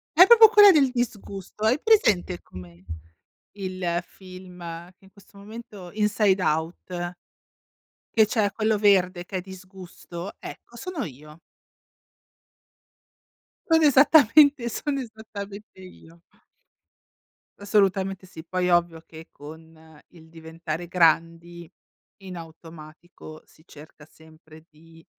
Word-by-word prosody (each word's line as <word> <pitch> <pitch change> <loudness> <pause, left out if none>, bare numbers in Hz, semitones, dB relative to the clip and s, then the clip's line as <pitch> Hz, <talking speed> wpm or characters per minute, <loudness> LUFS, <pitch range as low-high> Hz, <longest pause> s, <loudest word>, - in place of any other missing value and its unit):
È 360 +4 +8
proprio 450 0 +8
quella 415 -2 +7
del 280 -6 +3
disgusto. 210 -4 -6
Hai 245 +7 +2
presente 215 - +2
come 90 0 -14 0.7
il 185 -3 -4
film 185 -1 -14 0.4
che - - -26
in 190 - -20
questo 200 0 -20
momento 205 -3 -11
Inside 210 -2 +1
Out? 175 +2 -3 1.0
Che 220 -1 +5
c'è 210 -2 -1
quello 215 +1 0
verde 185 -3 +2
che 190 - -7
è - - -4
disgusto, 185 -1 -11
ecco 240 - -12
sono 340 +3 -6
io. 150 +3 -14 2.3
Sono 320 -1 +4
esattamente 285 -2 +5
sono 275 +4 -4
esattamente 215 -4 -10
io. 170 -2 -16 1.4
Assolutamente 195 -2 0
sì. 160 -3 -12
Poi 180 +1 -2
ovvio 170 -1 +1
che 160 0 -13
con 160 +1 -15
il 160 -2 -19
diventare 165 +1 -8
grandi 170 0 0 0.5
in 185 -2 -9
automatico 160 -1 -13
si 155 - -25
cerca 150 -1 -16
sempre 160 0 -19
di, 165 +1 -20
185 Hz, 110 wpm, -24 LUFS, 165-215 Hz, 2.3 s, È